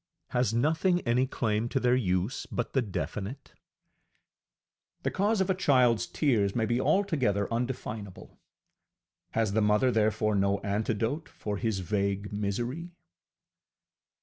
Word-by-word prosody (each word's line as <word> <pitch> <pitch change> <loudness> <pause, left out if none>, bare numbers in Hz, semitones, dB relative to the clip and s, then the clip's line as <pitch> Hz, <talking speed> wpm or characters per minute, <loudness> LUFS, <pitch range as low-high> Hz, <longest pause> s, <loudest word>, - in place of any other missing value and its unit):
Has 125 -3 +1
nothing 160 +9 +2
any 125 +2 +1
claim 115 -2 -1
to 135 - 0
their 125 -1 +3
use 95 0 -1
but 120 - -3
the 135 - +3
definite? 105 - -5 1.5
The - - 0
cause 205 +2 +1
of 190 - 0
a - - +3
childŌĆÖs 125 - +3
tears 110 -10 +1
may 115 -2 +1
be 120 +3 0
altogether 135 - +1
undefinable: 115 -5 -5 0.9
has 110 -3 +1
the 110 - +2
mother 105 +5 +3
therefore 110 -1 +1
no 100 0 +2
antidote 110 +8 -1
for 105 -1 -4
his 110 -3 -1
vague 100 +1 -1
misery? 120 - -3
115 Hz, 125 wpm, -29 LUFS, 105-130 Hz, 1.5 s, their